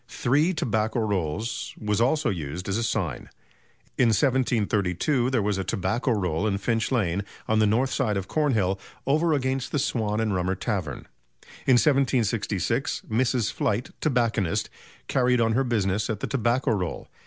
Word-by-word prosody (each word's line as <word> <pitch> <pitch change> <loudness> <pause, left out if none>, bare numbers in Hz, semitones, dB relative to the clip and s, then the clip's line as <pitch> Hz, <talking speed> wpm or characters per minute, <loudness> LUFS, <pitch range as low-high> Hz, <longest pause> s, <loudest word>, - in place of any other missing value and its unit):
"Three 150 +8 +1
Tobacco 110 - 0
Rolls" 105 0 -2
was 105 0 0
also 135 +1 +2
used 85 0 -5
as 100 - -1
a - - -1
sign. 95 - -2 0.7
In 125 - +5
1732 120 - +1
there 125 -5 +1
was 100 -1 0
a - - -1
"Tobacco 95 +8 -1
Roll" 95 -4 0
in 100 -2 0
Finch 115 +3 -1
Lane, 100 -6 0 0.2
on 110 0 +2
the 110 - +4
north 125 +6 +1
side 110 -7 0
of 95 -1 -4
Cornhill, 110 -11 +1 0.3
"over 155 +4 +2
against 130 -1 -1
the - - 0
Swan 110 -6 0
and 110 -2 0
Rummer 95 +1 0
Tavern." - - -3 0.6
In 130 - +6
1766, 120 - +1
Mrs. 120 -1 +1
Flight, 105 +5 -1
tobacconist, 115 - 0 0.4
carried 125 -1 +2
on 115 -1 +2
her 135 +4 +2
business 105 -4 0
at 110 -3 -2
the - - -2
"Tobacco 125 0 +1
Roll. 90 -6 -2
110 Hz, 155 wpm, -25 LUFS, 100-130 Hz, 0.7 s, In